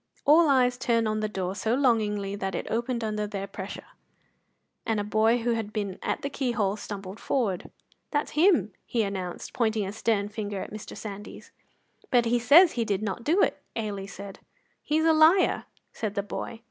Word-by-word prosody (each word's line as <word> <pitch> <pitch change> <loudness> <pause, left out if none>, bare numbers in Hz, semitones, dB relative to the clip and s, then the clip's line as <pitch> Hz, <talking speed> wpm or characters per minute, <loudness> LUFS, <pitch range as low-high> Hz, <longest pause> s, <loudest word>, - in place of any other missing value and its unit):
All 310 +2 +6
eyes 250 -2 +3
turned 230 -2 +1
on 215 0 0
the 215 0 -1
door 190 -2 -3
so 220 +4 0
longingly 210 -6 +1
that 195 -1 -3
it - - -3
opened 235 +1 -1
under 210 -1 -2
their 200 -1 -4
pressure, 195 0 -7 1.0
and 225 -2 0
a - - -1
boy 220 +3 +2
who 240 - +1
had 225 -2 -2
been 205 -3 -3
at - - -2
the 280 - -1
keyhole 235 -8 0
stumbled 200 -1 -7
forward. 210 -10 -1 0.4
"That's 290 -1 -1
him!" 305 - +3 0.2
he 230 -2 +1
announced, 190 -3 -5
pointing 220 -3 +1
a 195 - -5
stern 210 -2 0
finger 205 -2 -4
at - - -6
Mr. 215 - -8
Sandys. 205 -1 -8 0.6
"But 245 -2 +4
he 240 +1 +2
says 315 +9 +7
he 235 - -1
did 205 -2 -1
not 210 +2 -3
do 335 - +3
it," - - 0
Ailie 205 -3 -3
said. 195 0 -9 0.4
"He's 315 +1 +1
a 325 - +5
liar," 315 +4 +4 0.3
said 215 -2 -4
the 200 - 0
boy. 225 +3 -6
215 Hz, 185 wpm, -27 LUFS, 200-245 Hz, 1.0 s, says